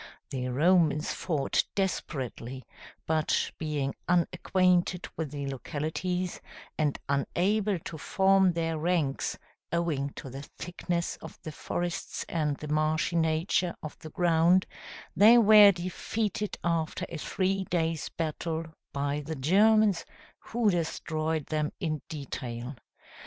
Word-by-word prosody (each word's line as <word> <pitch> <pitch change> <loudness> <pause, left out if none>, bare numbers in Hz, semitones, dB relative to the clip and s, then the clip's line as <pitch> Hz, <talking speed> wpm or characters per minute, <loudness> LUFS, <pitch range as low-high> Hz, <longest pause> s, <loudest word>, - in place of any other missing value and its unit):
The 130 -2 -2
Romans 155 +2 +3
fought 150 -5 0
desperately; 130 - -3 0.4
but 155 -1 +1
being 150 -4 -1 0.2
unacquainted 180 0 +2
with 160 -3 -3
the 140 0 -5
localities, 160 +7 -3 0.3
and 150 -2 0
unable 195 +8 +1
to 160 -1 -8
form 190 0 +3
their 165 -1 -1
ranks 160 -4 0 0.3
owing 160 -5 0
to 135 - -8
the 135 +2 -6
thickness 170 +3 -4
of - - -11
the 155 - -5
forests 175 +3 -4
and 150 -4 -1
the 150 - -7
marshy 155 +2 +1
nature 165 +2 +1
of 155 - -6
the 155 - -9
ground, 175 +2 +3 0.5
they 220 +4 +8
were 210 -2 +9
defeated 200 +4 -3
after 165 -2 -1
a 170 - -6
three 190 +4 -1
days' 165 -3 -1
battle, 160 0 -3 0.2
by 140 +1 -1
the 160 +2 -4
Germans, 205 +7 +4 0.4
who 225 -3 +1
destroyed 160 -2 -1
them 150 -1 -1
in 155 -5 -2
detail. 130 -3 -5
165 Hz, 120 wpm, -29 LUFS, 150-180 Hz, 0.5 s, were